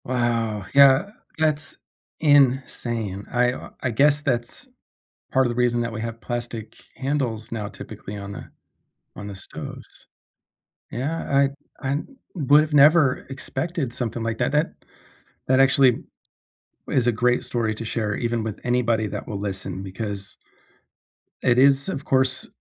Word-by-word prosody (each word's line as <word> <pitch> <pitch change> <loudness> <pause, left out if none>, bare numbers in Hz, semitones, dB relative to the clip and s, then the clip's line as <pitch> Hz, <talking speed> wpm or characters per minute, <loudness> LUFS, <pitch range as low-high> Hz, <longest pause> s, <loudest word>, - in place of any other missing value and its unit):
Wow, 115 -4 -1
yeah, 140 +7 +6 0.3
that's 155 -1 0 0.4
insane. 125 - +2
I, 125 0 +3
uh, - - -9
I 130 - -1
guess 145 +5 +4
that's 120 -4 -2 0.7
part 130 0 +4
of - - 0
the - - -3
reason 120 -1 +2
that 120 0 -2
we 110 - -4
have 115 0 -5
plastic 120 -2 -5 0.2
handles 130 -5 -2
now 105 -3 -3
typically 100 0 -9
on 100 0 -7
the - - -8 0.7
on 100 - -7
the 100 - -7
stoves. - - -10 0.8
Yeah, 145 +8 -3 0.6
I 135 - -2
I 140 - +1 0.4
would’ve 150 0 +4
never 145 -1 +5
expected 135 +1 -3
something 120 -1 -3
like 115 0 -2
that - - 0
that 150 +2 +2 0.8
that 130 +1 +4
actually 135 -2 +4 0.9
is 125 -2 +2
a 120 - +4
great 125 0 +3
story 115 -3 -1
to 110 - -6
share 110 -2 -2
even 120 -1 -1
with 110 -2 -5
anybody 120 -3 +1
that - - -6
will 100 - -4
listen 95 -1 -4
because 100 +1 -5 1.1
it 120 - +3
is, 135 +4 +5
of 145 -5 -4
course, 130 0 +1
125 Hz, 145 wpm, -23 LUFS, 110-135 Hz, 1.1 s, yeah